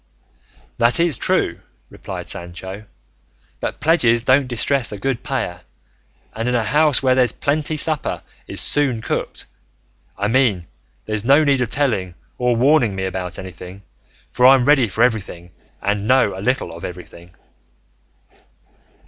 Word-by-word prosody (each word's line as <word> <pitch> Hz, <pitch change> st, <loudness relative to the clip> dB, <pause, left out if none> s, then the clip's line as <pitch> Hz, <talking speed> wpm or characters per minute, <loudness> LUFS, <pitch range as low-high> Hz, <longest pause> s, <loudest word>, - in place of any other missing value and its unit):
"That 120 Hz, +3 st, +2 dB
is 170 Hz, -4 st, +2 dB
true," -, -, 0 dB, 0.3 s
replied -, -, -8 dB
Sancho; 95 Hz, +4 st, -6 dB, 0.7 s
"but -, -, -5 dB
pledges 120 Hz, -8 st, +2 dB
don't 130 Hz, +2 st, +3 dB
distress 125 Hz, +1 st, 0 dB
a 105 Hz, -, -6 dB
good 125 Hz, +3 st, -3 dB
payer, 130 Hz, -11 st, -4 dB, 0.7 s
and 115 Hz, +2 st, -3 dB
in 125 Hz, -, 0 dB
a 120 Hz, -, +1 dB
house 150 Hz, +4 st, +3 dB
where 130 Hz, -1 st, +3 dB
there's 130 Hz, -1 st, +2 dB
plenty 155 Hz, +2 st, -2 dB
supper 155 Hz, -1 st, +3 dB, 0.2 s
is -, -, +1 dB
soon 130 Hz, -6 st, +1 dB
cooked; -, -, -4 dB, 0.7 s
I 100 Hz, -, -1 dB
mean 115 Hz, -7 st, +1 dB, 0.4 s
there's 110 Hz, -1 st, -2 dB
no 140 Hz, +5 st, +4 dB
need 140 Hz, -3 st, +2 dB
of 120 Hz, -, -1 dB
telling 105 Hz, -11 st, -1 dB, 0.2 s
or 125 Hz, -1 st, +1 dB
warning 125 Hz, -4 st, +2 dB
me 95 Hz, -, -4 dB
about 90 Hz, -1 st, -5 dB
anything; 95 Hz, +1 st, -10 dB, 0.5 s
for 125 Hz, +1 st, +4 dB
I'm 130 Hz, -2 st, +5 dB
ready 140 Hz, -4 st, +4 dB
for 110 Hz, +4 st, 0 dB
everything 95 Hz, -7 st, -2 dB, 0.3 s
and 100 Hz, +1 st, -1 dB
know 125 Hz, -6 st, +3 dB
a 95 Hz, -, -7 dB
little 125 Hz, -4 st, -1 dB
of 85 Hz, -, -11 dB
everything." 85 Hz, -1 st, -10 dB
120 Hz, 145 wpm, -19 LUFS, 95-135 Hz, 0.7 s, I'm